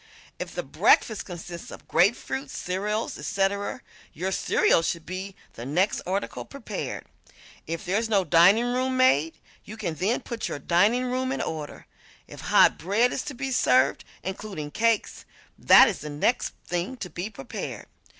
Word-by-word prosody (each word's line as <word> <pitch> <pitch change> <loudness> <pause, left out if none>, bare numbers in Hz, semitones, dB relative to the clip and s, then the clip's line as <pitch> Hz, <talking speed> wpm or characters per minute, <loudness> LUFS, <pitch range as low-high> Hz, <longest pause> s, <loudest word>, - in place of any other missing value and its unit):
If - - -6
the - - -2
breakfast 220 -4 +2
consists 175 -1 -8
of - - -12
grapefruit, 245 +8 +1
cereals, 210 +3 -3
etc., 200 +4 -1 0.3
your 185 +5 -3
cereal 170 - +3
should 165 0 -3
be 185 +2 -6 0.2
the 115 - -8
next 175 - 0
article 195 +2 -3
prepared. 280 - -6 0.6
If 165 +1 -4
there 190 +4 +1
is 225 0 -3
no 200 -3 +3
diningroom 240 - +4
maid, 165 - +3 0.3
you 215 +2 -10
can 185 -7 -3
then 195 - 0
put 235 -2 -5
your - - -4
diningroom 245 - +1
in 270 - -2
order. 155 -2 -5 0.4
If - - -11
hot - - +4
bread 210 +8 +2
is - - -2
to 285 - -6
be 270 +2 -4
served 130 - +3 0.2
(including 190 -5 -6
cakes) 230 +2 0 0.4
that - - +8
is 210 - -2
the 150 - -7
next 150 +12 0
thing 180 +9 -3
to 185 - -6
be 175 +6 -4
prepared. 135 - -7
195 Hz, 155 wpm, -26 LUFS, 170-235 Hz, 0.6 s, that